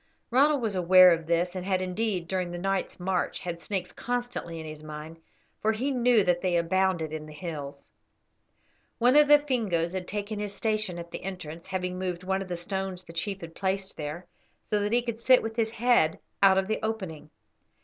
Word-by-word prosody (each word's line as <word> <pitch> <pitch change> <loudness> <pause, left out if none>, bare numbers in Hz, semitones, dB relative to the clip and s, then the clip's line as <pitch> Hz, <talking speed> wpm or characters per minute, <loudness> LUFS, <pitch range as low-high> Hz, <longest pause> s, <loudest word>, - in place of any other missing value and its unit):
Ronald 280 +1 +4
was 215 -3 0
aware 185 0 +7
of 165 -1 -4
this, 170 +2 +1
and 185 - -3
had, 190 0 +1
indeed, 185 -1 -2
during 185 -1 -1
the 175 - -5
night's 195 +1 -2
march, 180 0 -1
had 170 -1 -5
snakes 185 -2 -3
constantly 245 -9 -4
in 160 - -7
his 155 -1 -8
mind, 155 +1 -8 0.4
for 220 +1 +2
he 255 +6 -1
knew 245 -4 +4
that 175 -1 +1
they 180 -2 +1
abounded 170 -2 +1
in 155 -1 -5
the 155 - -10
hills. 145 -4 -7 1.1
One 245 +3 +4
of 300 0 +7
the 295 0 +9
Fingoes 215 - -1
had 185 -1 -4
taken 205 +1 -4
his 205 -1 -4
station 215 -5 -1
at 170 0 -8
the - - -6
entrance, 170 -4 -7
having 180 -1 -3
moved 180 -1 -3
one 190 +1 0
of 195 - -5
the 175 -1 -3
stones 190 +1 -4
the 165 - -12
chief 195 +3 -3
had 165 -1 -8
placed 190 +1 -2
there, 155 +4 -5 0.5
so 210 - +3
that 205 +1 -1
he 240 +1 +3
could 235 -1 -4
sit 255 +1 +5
with 225 0 -4
his 225 -2 +1
head 230 -8 +3 0.2
out 195 -1 +6
of 190 0 +1
the 220 - -1
opening. 185 -9 -4
185 Hz, 205 wpm, -28 LUFS, 170-215 Hz, 1.1 s, the